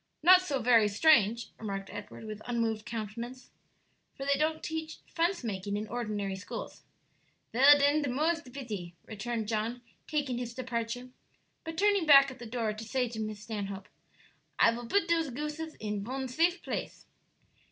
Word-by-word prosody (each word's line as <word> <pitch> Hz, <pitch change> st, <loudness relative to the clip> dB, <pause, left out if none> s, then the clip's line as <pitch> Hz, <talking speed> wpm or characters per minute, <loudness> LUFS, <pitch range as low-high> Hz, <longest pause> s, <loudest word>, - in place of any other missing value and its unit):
'" -, -, -49 dB
"Not 365 Hz, +2 st, +8 dB
so 290 Hz, -7 st, -2 dB
very 230 Hz, -3 st, +6 dB
strange," 230 Hz, -1 st, +4 dB
remarked 195 Hz, -2 st, -5 dB
Edward, -, -, -8 dB
with 215 Hz, -1 st, -7 dB
unmoved 230 Hz, -2 st, -1 dB
countenance, 235 Hz, +3 st, -6 dB, 0.6 s
"for 275 Hz, -, -6 dB
they 280 Hz, -, +3 dB
don't 315 Hz, +2 st, 0 dB
teach 320 Hz, 0 st, -4 dB
fence 340 Hz, -1 st, 0 dB
making 200 Hz, -2 st, -3 dB
in 215 Hz, +1 st, -4 dB
ordinary 210 Hz, -5 st, -3 dB
schools." 205 Hz, -, -7 dB, 0.7 s
"Vell, 275 Hz, +5 st, +8 dB
den, 285 Hz, +2 st, +3 dB
de 285 Hz, -, -1 dB
more's 320 Hz, +6 st, +1 dB
de 265 Hz, -, -14 dB
bity," 215 Hz, -10 st, -6 dB
returned 225 Hz, +1 st, -4 dB
John, 225 Hz, +3 st, -2 dB, 0.2 s
taking 280 Hz, -6 st, -1 dB
his 240 Hz, -1 st, -5 dB
departure. 245 Hz, 0 st, -3 dB, 0.5 s
But 325 Hz, -1 st, -6 dB
turning 400 Hz, -3 st, +3 dB
back 275 Hz, -2 st, +8 dB
at 260 Hz, -, -12 dB
the 240 Hz, -, -8 dB
door 225 Hz, -2 st, -1 dB
to 215 Hz, +1 st, -8 dB
say 250 Hz, +2 st, -1 dB
to 225 Hz, -1 st, -6 dB
Miss 215 Hz, -1 st, -4 dB
Stanhope, 200 Hz, -3 st, -5 dB, 0.7 s
"I -, -, +6 dB
vill 235 Hz, 0 st, -6 dB
put 400 Hz, +4 st, +2 dB
dose 330 Hz, -3 st, +2 dB
gooses 300 Hz, +4 st, -5 dB
in 210 Hz, -2 st, -4 dB
von 260 Hz, +4 st, -3 dB
safe 340 Hz, +7 st, +1 dB
place." -, -, -5 dB
245 Hz, 170 wpm, -30 LUFS, 215-300 Hz, 0.7 s, Not